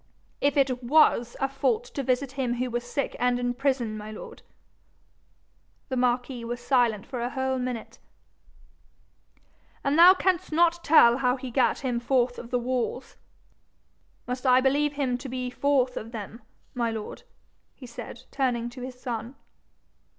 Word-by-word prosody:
'If 285 0 +2
it 260 -2 +2
WAS 240 -3 +3
a 270 - +1
fault 430 - 0
to 310 -11 -5
visit 255 +1 0
him 260 -3 -2
who 250 0 -2
was 240 0 -2
sick 275 +3 -3
and 245 0 +2
in 245 0 -1
prison, 250 -4 -1
my 215 0 -7
lord.' 215 - -10 1.5
The 260 - -2
marquis 250 0 0
was 240 +1 -4
silent 240 -5 +1
for 250 -3 -5
a 240 - -1
whole 265 0 -1
minute. 250 -2 -5 1.8
'And 285 +3 +1
thou 360 +2 +9
canst 370 -3 0
not 340 +2 +2
tell 240 -6 +6
how 250 -2 +2
he 255 -1 -7
gat 255 +1 +2
him 250 -3 -1
forth 245 0 +1
of 235 - -9
the 250 - +1
walls? 250 +1 -3 1.1
Must 250 0 -4
I 255 0 +6
believe 285 +3 +2
him 260 -4 -1
to 265 - -7
be 250 0 -4
forth 260 -2 +1
of 225 +1 -6
them, 225 +1 -8 0.3
my 235 -1 0
lord?' 220 -2 -6 0.5
he 260 - -12
said, 235 0 -9
turning 240 -3 -1
to 250 - -10
his 250 0 -8
son. 240 +1 -5
250 Hz, 160 wpm, -26 LUFS, 240-275 Hz, 1.8 s, thou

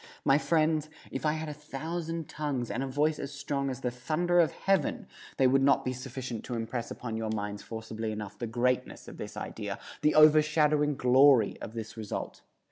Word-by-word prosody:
My 135 +1 +5
friends, 155 -1 +1 0.2
if 135 +4 -2
I 150 - +2
had 160 0 -4
a 150 - -4
thousand 160 +2 -5
tongues, 140 -6 -3
and 125 - -2
a 135 - -2
voice 150 +3 +1
as 140 - -5
strong 140 -1 -2
as 130 0 -5
the 125 - -1
thunder 165 +8 +1
of 165 -3 +4
heaven, 195 +4 0 0.3
they 135 - +4
would 135 +1 +4
not 140 0 +3
be 130 - -1
sufficient 130 -2 -6
to 120 - -4
impress 115 +1 -3
upon 115 -3 -5
your 110 -1 -2
minds 105 -1 -3
forcibly 110 -1 -5
enough 105 -2 -6
the 120 - -3
greatness 125 +2 -1
of - - -10
this - - -7
idea, - - -5 0.2
the 150 - +3
overshadowing 150 -1 +5
glory 130 -2 +5
of 110 - -7
this 115 0 -6
result. 110 -2 -5
135 Hz, 195 wpm, -29 LUFS, 120-155 Hz, 0.3 s, My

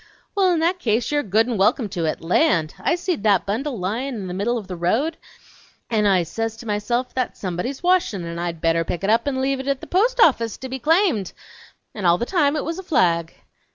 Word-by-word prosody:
Well, 390 -2 +3
in 340 - +1
that 355 +3 +1
case 230 -3 0
you're 295 0 +2
good 220 0 +2
n' 240 -3 -2
welcome 215 +4 +2
to 170 -3 -2
it! 155 - -2
Land! 165 - +2
I 340 - +1
seen 355 - -2
that 205 -3 +3
bundle 240 +6 -2
lyin' 230 +8 -3
in 205 -4 -5
the 180 - -5
middle 215 +6 0
o' - - -3
the 185 -1 -7
road 225 - 0 0.8
and 210 -2 +2
I 185 -3 +3
says 225 +6 -4
to 235 - -11
myself, 235 +4 -1
that's 255 -1 -3
somebody's 195 - -4
washin' 350 - +1
and 170 0 -5
I'd 170 -2 -4
better 165 0 +2
pick 170 +3 -4
it 200 - +2
up 230 +4 +2
and 265 -2 -1
leave 270 0 0
it 265 - -6
at 275 -1 0
the - - -9
post 475 +7 +1
office 235 - +3
to 260 - -7
be 265 +1 -4
claimed; 315 - +2 0.6
n' 205 -4 -5
all 170 0 +5
the 235 - -2
time 300 -2 +2
it 305 - -2
was 330 +3 -4
a - - -7
flag!" 170 - +1
230 Hz, 235 wpm, -22 LUFS, 185-285 Hz, 0.8 s, all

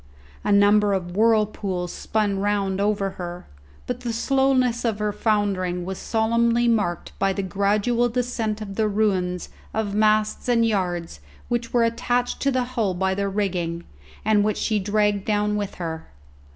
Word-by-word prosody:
A - - 0
number 205 0 +5
of 175 -2 -3
whirlpools 210 -5 +1
spun 205 -3 -1
round 200 -1 0
over 200 -1 0
her, 175 0 -6 0.4
but 250 0 -3
the 245 -2 -3
slowness 255 0 +2
of 225 -4 0
her 210 0 -1
foundering 200 -4 0
was 190 0 -5
solemnly 235 +1 +2
marked 205 -7 0
by 195 0 +2
the 195 - -3
gradual 205 +5 +1
descent 230 -3 -2
of 195 -2 -7
the 220 -1 +2
ruins 190 -4 0 0.3
of 215 -2 -1
masts 215 +3 +2
and 230 -1 +4
yards 175 - -1 0.3
which 235 -1 -1
were 240 -1 +3
attached 245 +2 0
to 275 - +2
the 255 -2 +1
hull 230 -7 -1
by 190 +1 0
their 200 +1 -1
rigging, 180 -4 -2 0.4
and 210 -1 +4
which 215 0 0
she 215 -2 0
dragged 205 0 +1
down 210 0 0
with 205 -1 -3
her. 160 -2 -5
210 Hz, 160 wpm, -23 LUFS, 195-230 Hz, 0.4 s, number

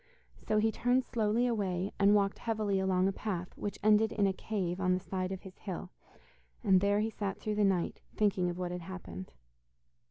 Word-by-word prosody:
So 215 - +2
he 220 +1 +3
turned 250 +3 +2
slowly 225 +1 +1
away, 195 -5 -1
and 200 +1 +6
walked 200 -1 +1
heavily 215 -4 0
along 190 -1 +2
a - - +2
path 185 -3 -4
which 205 - -4
ended 215 +1 +5
in 205 - +2
a 195 - +2
cave 190 -3 -3
on 185 -1 +3
the - - -1
side 185 0 -3
of 190 - -5
his 190 -1 -12
hill, 185 -1 -6 0.7
and 190 -4 +5
there 205 +1 +3
he 220 +1 -1
sat 200 -3 -3
through 215 - -2
the 210 0 +2
night, 190 -3 +1
thinking 195 -4 +2
of 175 - -4
what 180 -1 -3
had 180 0 -4
happened. 130 - -8
195 Hz, 200 wpm, -32 LUFS, 185-210 Hz, 0.7 s, and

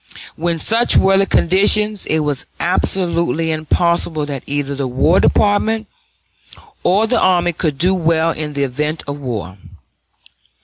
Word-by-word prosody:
When 170 +1 -2
such 230 +8 +2
were 195 0 +4
the 195 - +2
conditions, 205 +3 +1
it 160 0 0
was 145 -3 -2
absolutely 170 -2 0
impossible 160 0 0
that 140 -3 -5
either 140 0 -3
the 140 -1 -3
War 135 +8 +2
Department 215 +2 +1 1.0
or 200 +5 +2
the 240 +2 +1
army 175 -2 +2
could 155 -3 -2
do 180 +6 +2
well 165 -2 +1
in 150 -2 -5
the 140 0 -1
event 150 +4 -3
of 145 0 -6
war. 110 -8 -6
165 Hz, 140 wpm, -17 LUFS, 145-185 Hz, 1.0 s, were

